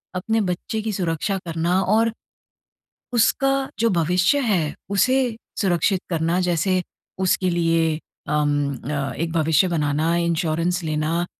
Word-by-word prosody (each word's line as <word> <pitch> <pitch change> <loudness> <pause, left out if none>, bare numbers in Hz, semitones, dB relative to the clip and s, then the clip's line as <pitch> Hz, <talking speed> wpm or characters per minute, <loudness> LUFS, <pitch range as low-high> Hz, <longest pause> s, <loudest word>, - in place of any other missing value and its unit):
अपने 220 +5 0
बच्चे 200 +4 -2
की 220 - -2
सुरक्षा 185 +2 -1
करना 170 +3 0
और, 220 +4 +2 1.0
उसका 270 +3 +2
जो 230 0 +3
भविष्य 180 - +2
है, 185 - 0 0.2
उसे 250 +4 +2 0.3
सुरक्षित 185 0 +1
करना 165 +1 0
जैसे 180 +1 +1 0.4
उसके 185 0 +1
लिए 165 -2 +1 0.4
अम 145 -2 +1 0.2
अ, 140 -2 -2
एक 165 +6 -3
भविष्य 160 +2 +3
बनाना, 155 0 0
इंश्योरेंस 170 +1 0
लेना 155 +2 -1
175 Hz, 120 wpm, -22 LUFS, 160-195 Hz, 1.0 s, जो